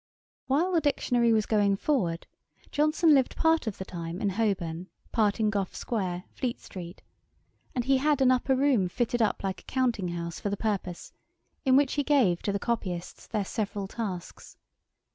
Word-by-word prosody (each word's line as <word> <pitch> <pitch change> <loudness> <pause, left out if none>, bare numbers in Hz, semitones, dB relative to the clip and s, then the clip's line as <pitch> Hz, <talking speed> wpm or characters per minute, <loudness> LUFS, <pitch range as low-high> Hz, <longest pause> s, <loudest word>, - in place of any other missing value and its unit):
] - - -
While 310 +8 +2
the 335 -3 +3
Dictionary 245 -5 +2
was 215 -1 +3
going 205 -2 +3
forward, 195 - 0 0.5
Johnson 305 +2 +4
lived 265 -3 +3
part 320 -5 +2
of 210 - -3
the 190 - -5
time 170 -1 -6
in 205 - +1
Holborn, 185 -5 -1 0.2
part 215 -1 +2
in 215 -1 +2
Gough 200 -3 -2
square, 185 -6 -2
Fleet 250 -3 -3
street; 175 -1 -9 0.7
and 245 -2 0
he 270 0 +4
had 295 +1 +2
an 260 -1 +5
upper 255 +1 +2
room 255 -9 +2
fitted 240 +3 -1
up 220 - +1
like 190 -1 -3
a - - -30
counting 245 -8 0
house 170 -1 -4
for 205 - -2
the 200 - -2
purpose, 195 -5 -3 0.5
in 260 -1 +5
which 275 -1 +4
he 290 - +1
gave 250 -13 +3
to 200 - -1
the 200 - 0
copyists 190 -6 -3
their 210 -3 -1
several 205 -2 -3
tasks. 190 -5 -6
220 Hz, 180 wpm, -28 LUFS, 190-260 Hz, 0.7 s, an